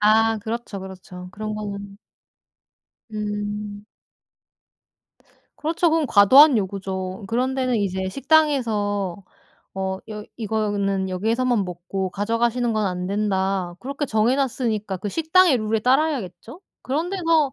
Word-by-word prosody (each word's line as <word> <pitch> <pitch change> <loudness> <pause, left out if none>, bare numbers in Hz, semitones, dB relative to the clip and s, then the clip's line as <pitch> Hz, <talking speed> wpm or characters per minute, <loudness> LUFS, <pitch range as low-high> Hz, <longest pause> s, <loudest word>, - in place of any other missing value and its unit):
아 220 +1 +4
그렇죠, 220 -1 -5
그렇죠 185 -1 -10
그런 215 0 -4
거는. 200 -1 -6 1.2
음. 210 0 -4 1.7
그렇쵸. 330 +2 +1
그건 320 -2 +2
과도한 260 +7 +7
요구죠. 190 0 -4
그런 250 +5 0
데는 255 -2 0
이제 190 -2 -1
식당에서 220 - +1 0.6
어 190 0 -2
여 210 -1 -6
"이거는 205 -3 -1
여기에서만 225 +3 0
먹고 180 +2 -4
가져가시는 230 +3 0
건 215 -2 0
안 180 -1 -2
된다." 195 -3 -1
그렇게 280 +3 -4
정해 225 +1 +2
놨으니까 225 -7 -1
그 205 +3 -4
식당의 325 - +4
룰에 215 0 0
따라야겠죠? 255 - 0 0.2
그런 310 +7 -2
데서 330 -7 +2
215 Hz, 265 characters per minute, -23 LUFS, 195-255 Hz, 1.7 s, 과도한